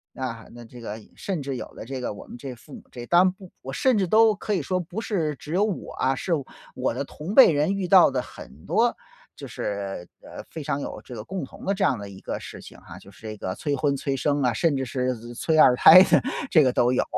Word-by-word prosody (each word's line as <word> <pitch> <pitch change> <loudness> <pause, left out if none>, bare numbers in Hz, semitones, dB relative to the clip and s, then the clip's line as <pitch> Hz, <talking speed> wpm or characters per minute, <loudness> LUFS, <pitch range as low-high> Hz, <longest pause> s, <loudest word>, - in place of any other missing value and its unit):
啊， 115 -3 -6
那 120 0 -12
这 120 +1 -13
个 110 -1 -6 0.2
甚 180 -8 -4
至 135 -1 -4
有 - - -6
了 - - -11
这 130 +1 -6
个 125 - -3
我 100 - -11
们 - - -11
这 130 -3 -7
父 135 +4 -16
母 - - -10
这 120 -1 -8
当 175 +5 +5
然 185 - +3
不 190 -1 -15
我 135 - -7
甚 255 - +2
至 190 - +1
都 220 +3 +5
可 205 +1 -4
以 170 - -2
说 185 +6 -1
不 175 +4 -6
是 165 -10 -2
只 150 +4 -9
有 195 - +3
我 210 -5 -3
啊， 135 +1 0
是 180 - -5 0.4
我 130 - -1
的 - - -3
同 165 +10 -7
辈 265 - +9
人 155 +6 +1
遇 190 -2 -2
到 185 -5 +7
的 130 - -2
很 70 - -13
多 - - +1 0.4
就 - - -9
是， 100 -3 -5 0.2
呃， - - -9
非 160 - -7
常 140 - -2
有 - - -6
这 - - -11
个 110 -3 -7
共 180 - -5
同 - - -13
的 195 - +1
这 - - -1
样 125 -6 +2
的 100 -1 -8
一 95 - -12
个 - - -5
事 - - -10
情 - - -13
哈， - - -12
就 100 - -15
是 95 - -20
这 110 -1 -7
个 95 - -4
催 145 +8 -2
婚 145 -1 0
催 140 0 -2
生 145 +2 0
啊， 125 -2 +2
甚 150 +6 +1
至 135 -1 -2
是 125 0 -1 0.2
催 160 +6 0
二 125 -5 +7
胎 170 +8 +9
的 190 - +5 0.3
这 155 - +5
个 130 -2 +2
都 120 0 +2
有。 - - +2
140 Hz, 285 characters per minute, -24 LUFS, 120-180 Hz, 0.4 s, 辈